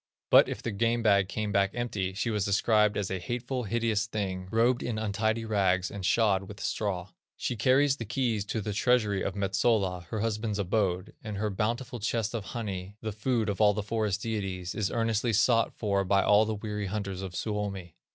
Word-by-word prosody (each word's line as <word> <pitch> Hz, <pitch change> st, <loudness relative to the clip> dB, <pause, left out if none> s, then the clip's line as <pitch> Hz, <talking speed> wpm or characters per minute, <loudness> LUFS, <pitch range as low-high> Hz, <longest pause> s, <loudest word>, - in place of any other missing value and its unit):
But -, -, +7 dB
if -, -, -5 dB
the 115 Hz, -, -2 dB
game 115 Hz, +3 st, +1 dB
bag 100 Hz, -3 st, +4 dB
came 105 Hz, 0 st, -2 dB
back 100 Hz, -1 st, +3 dB
empty, 105 Hz, -6 st, -2 dB
she 115 Hz, +3 st, -1 dB
was 105 Hz, -3 st, 0 dB
described 105 Hz, +2 st, +3 dB
as 100 Hz, -2 st, -2 dB
a 95 Hz, -, -2 dB
hateful, 120 Hz, +5 st, -3 dB
hideous 110 Hz, 0 st, 0 dB
thing, 95 Hz, -4 st, -3 dB
robed 120 Hz, +4 st, +2 dB
in 120 Hz, -3 st, -2 dB
untidy 110 Hz, +1 st, -1 dB
rags, 95 Hz, -4 st, +1 dB
and 100 Hz, -2 st, -6 dB
shod 100 Hz, 0 st, +3 dB
with 105 Hz, +1 st, -10 dB
straw. 95 Hz, -4 st, -2 dB, 0.3 s
She 125 Hz, -, -2 dB
carries 135 Hz, +5 st, +3 dB
the 115 Hz, -, -5 dB
keys 115 Hz, -2 st, 0 dB
to 110 Hz, +2 st, -2 dB
the 105 Hz, +1 st, -3 dB
treasury 105 Hz, -3 st, +2 dB
of 95 Hz, -, -2 dB
Metsola, 95 Hz, -2 st, +1 dB
her 110 Hz, +3 st, -4 dB
husband's 110 Hz, -1 st, -1 dB
abode, 95 Hz, -1 st, 0 dB
and 105 Hz, -3 st, -5 dB
her 105 Hz, +1 st, -1 dB
bountiful 120 Hz, +5 st, -2 dB
chest 115 Hz, 0 st, -1 dB
of 110 Hz, -4 st, -3 dB
honey, 100 Hz, -4 st, -5 dB
the 110 Hz, -, -3 dB
food 115 Hz, +1 st, 0 dB
of 100 Hz, 0 st, -1 dB
all 105 Hz, -1 st, +5 dB
the 105 Hz, -, -2 dB
forest 105 Hz, -2 st, -1 dB
deities, 95 Hz, -5 st, -3 dB
is 105 Hz, -3 st, -1 dB
earnestly 115 Hz, 0 st, 0 dB
sought 115 Hz, +2 st, +3 dB
for 100 Hz, -3 st, 0 dB
by 100 Hz, +1 st, +3 dB
all 105 Hz, +1 st, +5 dB
the 110 Hz, 0 st, -2 dB
weary 105 Hz, -1 st, -4 dB
hunters 100 Hz, -2 st, -4 dB
of 95 Hz, -2 st, -6 dB
Suomi. 100 Hz, -5 st, -3 dB
105 Hz, 200 wpm, -29 LUFS, 100-115 Hz, 0.3 s, But